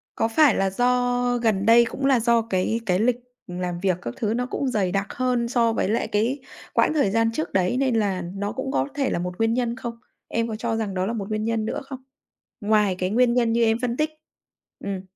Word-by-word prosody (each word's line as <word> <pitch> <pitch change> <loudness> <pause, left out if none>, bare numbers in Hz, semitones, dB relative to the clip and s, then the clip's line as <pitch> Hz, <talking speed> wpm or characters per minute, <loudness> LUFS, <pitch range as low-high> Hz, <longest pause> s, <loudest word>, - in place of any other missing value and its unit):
Có - - +1
phải 270 +1 +4
là 195 0 +1
do 245 +3 +1
gần 220 -5 +1
đây 235 +2 +6
cũng 270 +3 -4
là 270 -3 +4
do 235 0 +3
cái 220 0 -1
cái 185 -3 +1
lịch 240 +2 +2 0.3
làm 180 -1 -4
việc 185 -1 +1
các 120 - -5
thứ 215 -1 -1
nó 245 +2 -1
cũng 275 +1 -3
dày 205 -7 0
đặc 195 +1 -1
hơn 250 -2 0
so 235 -2 +2
với 210 - 0
lại 225 - 0
cái 230 +7 0 0.3
quãng - - +3
thời 285 -11 +2
gian 225 +1 +2
trước 310 +7 -4
đấy 185 +5 +1
nên 265 -3 +1
là 200 -4 0
nó 200 +1 -3
cũng 265 +3 -4
có - - 0
thể 275 -2 0
là - - -1
một 180 +1 -4
nguyên 225 0 +1
nhân 240 -1 -1
không? 240 -2 -5 0.3
Em 230 0 -1
có 220 - -4
cho 230 +1 -2
rằng 220 -3 -2
đó 185 0 -1
là 225 - -2
một 205 -3 -4
nguyên 215 0 -2
nhân 225 -1 -1
nữa - - -3
không? 265 -1 -9 0.6
Ngoài 210 -2 +2
cái 185 - 0
nguyên 240 +3 +3
nhân 235 -2 +2
như 235 0 +2
em 225 0 +3
phân 245 -1 -1
tích. 305 0 +1 0.7
Ừm. 195 -2 -3
225 Hz, 240 wpm, -24 LUFS, 200-245 Hz, 0.7 s, đây